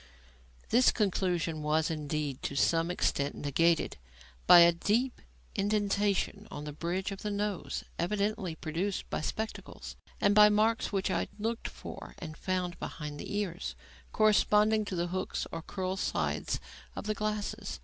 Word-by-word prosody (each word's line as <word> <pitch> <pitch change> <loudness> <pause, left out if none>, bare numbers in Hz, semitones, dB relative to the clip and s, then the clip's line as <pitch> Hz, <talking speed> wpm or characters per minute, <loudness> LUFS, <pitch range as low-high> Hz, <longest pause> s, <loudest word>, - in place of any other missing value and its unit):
This 250 +3 +5
conclusion 180 -6 0
was, 155 +2 +1
indeed, 150 -3 -3
to 140 - -3
some 165 +4 +2
extent 145 -5 0
negatived 165 - +1 0.5
by 175 - +10
a 170 0 +8
deep 220 +9 0 0.3
indentation 205 0 0
on 145 - -6
the 150 0 -6
bridge 175 +6 -2
of 195 - -6
the 210 - -2
nose, 205 -2 -2 0.2
evidently 200 -1 -1
produced 170 +6 -3
by - - -1
spectacles, 220 +7 -5 0.2
and 200 - +4
by 210 0 +8
marks 220 +2 +2
which 195 -1 0
I - - 0
looked 225 +2 -2
for - - -9
and 155 -3 -7
found 180 0 -2
behind 150 -1 -6
the - - -6
ears, 180 -4 -3 0.4
corresponding 215 0 +4
to 195 - -4
the 175 0 -1
hooks 185 +1 -2
or - - -4
"curl 185 +2 -3
sides" - - -1 0.4
of - - -5
the 215 - 0
glasses. 210 0 -3
190 Hz, 150 wpm, -31 LUFS, 165-210 Hz, 0.5 s, by